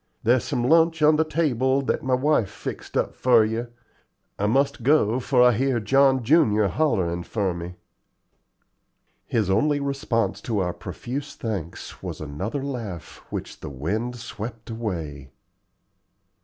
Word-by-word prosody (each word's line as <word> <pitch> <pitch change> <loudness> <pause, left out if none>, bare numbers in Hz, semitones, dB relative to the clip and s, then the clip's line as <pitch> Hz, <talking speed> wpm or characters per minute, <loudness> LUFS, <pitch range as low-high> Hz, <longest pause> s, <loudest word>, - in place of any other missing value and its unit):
There's 120 +2 +3
some 120 - -2
lunch 165 +1 +4
on 150 0 +6
the 160 - +4
table 140 -4 +1
that - - -1
my 130 -1 +1
wife 130 -6 +2
fixed - - -6
up - - 0
for 120 -4 +4
you. 115 +2 -2 0.7
I 105 - +1
must 135 +4 +1
go, 125 -3 +3
for 125 -1 +3
I 125 - +7
hear 125 +2 +1
John 135 +3 +3
junior 110 -7 +4
hollerin' 95 - 0
for 100 -3 -1
me." 85 +1 -7 1.5
His 105 -5 0
only 145 +9 +2
response 135 -7 -1
to 115 -3 -2
our 90 -3 0
profuse 140 +4 -6
thanks 100 -8 -5
was - - -6
another 95 - -4
laugh, 115 - -6
which - - -6
the - - -7
wind 100 - -3
swept 115 -1 -7
away. 80 - -5
120 Hz, 140 wpm, -24 LUFS, 100-140 Hz, 1.5 s, I